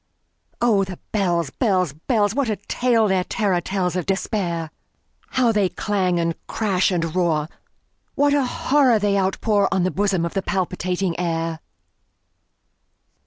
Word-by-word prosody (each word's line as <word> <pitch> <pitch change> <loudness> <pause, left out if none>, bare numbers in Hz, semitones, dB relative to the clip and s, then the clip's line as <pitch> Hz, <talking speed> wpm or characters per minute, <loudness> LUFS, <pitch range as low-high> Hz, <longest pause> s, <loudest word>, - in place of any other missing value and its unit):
Oh, 220 -5 +3
the 185 -2 -6
bells, 175 -8 0
bells, 185 - +1
bells! 205 - 0
What 275 -2 0
a 215 - 0
tale 225 +2 +1
their 190 -2 +1
terror 190 -3 0
tellsOf 180 -1 -1
Despair! 180 -4 -2 0.6
How 250 -3 +2
they 205 -4 +2
clang, 185 -4 0
and 165 0 0
clash, 195 -4 +1
and 165 -3 -1
roar! 160 -4 +1 0.7
What 285 0 +3
a 285 -1 +3
horror 260 -1 +2
they 205 -1 +1
outpourOn 195 0 +1
the 185 - +1
bosom 195 -4 0
of 170 - -4
the 195 - 0
palpitating 185 -2 -2
air! 165 -2 -2
190 Hz, 135 wpm, -22 LUFS, 175-210 Hz, 0.7 s, Oh